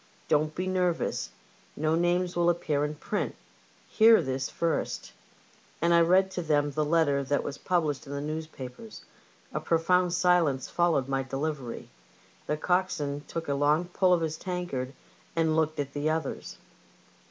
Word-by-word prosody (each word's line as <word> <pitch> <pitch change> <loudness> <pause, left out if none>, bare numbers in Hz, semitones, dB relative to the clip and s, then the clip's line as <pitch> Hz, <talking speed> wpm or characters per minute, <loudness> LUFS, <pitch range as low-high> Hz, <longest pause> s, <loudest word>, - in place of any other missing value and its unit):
Don't 155 +1 +1
be 185 - -2
nervous. 180 -2 0 0.5
No 155 +1 0
names 175 +2 +1
will 175 0 +3
appear 155 -4 0
in 150 +1 -2
print. 205 +7 -3 0.5
Hear 225 0 +6
this 130 -1 -2
first; 165 -1 -2 0.3
" - - -31
and 170 +1 +3
I 170 - +6
read 185 +3 +4
to 185 - -3
them 145 -3 +1
the 155 +2 0
letter 150 -3 +2
that 145 +1 0
was 140 - -5
published 155 -7 -1
in 140 - -6
the 140 - -3
newspapers. 155 - -7 0.5
A - - -1
profound 180 +2 +2
silence 175 -7 +2
followed 170 -7 +1
my 135 0 0
delivery; 135 -1 -4 0.6
the 150 - 0
coxswain 150 -5 0
took 165 -1 -5
a 140 - +1
long 150 +5 +2
pull 180 0 +3
at 165 - -2
his 160 0 -2
tankard 175 -9 -4 0.4
and 160 -1 +2
looked 155 -1 0
at 140 -1 -3
the 145 +1 0
others. 155 -3 -3
160 Hz, 160 wpm, -28 LUFS, 145-175 Hz, 0.6 s, Hear